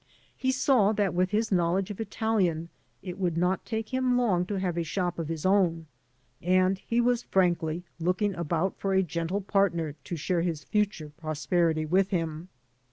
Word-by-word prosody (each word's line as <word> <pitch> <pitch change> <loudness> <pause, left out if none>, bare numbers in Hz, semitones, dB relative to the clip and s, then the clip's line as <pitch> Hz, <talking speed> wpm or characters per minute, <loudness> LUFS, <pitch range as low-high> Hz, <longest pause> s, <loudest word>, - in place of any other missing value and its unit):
He 260 - 0
saw 255 -5 +3
that 200 -3 +1
with 180 +1 +1
his 215 +2 0
knowledge 185 +2 +1
of 205 - -6
Italian 195 -7 0 0.3
it 185 0 -6
would 175 -3 0
not 180 +2 0
take 225 +1 -4
him 255 -1 +2
long 185 -8 +2
to 205 - -2
have 185 -3 -1
a 170 - 0
shop 175 +2 -2
of 165 - -3
his 165 0 -4
own, 180 -4 +2 0.6
and 185 +2 +2
he 235 +4 -1
was 240 0 +2
frankly 175 -4 +1 0.2
looking 185 +4 +1
about 170 +2 -1
for 195 -1 0
a 190 - +4
{gentle 170 +4 -2
partner 180 -6 +1
to 175 - -4
share 170 +2 0
his 165 -4 -2
future 205 -8 -1
prosperity 155 +1 0
with 190 +4 +2
him. 165 -2 -3
185 Hz, 175 wpm, -28 LUFS, 170-205 Hz, 0.6 s, a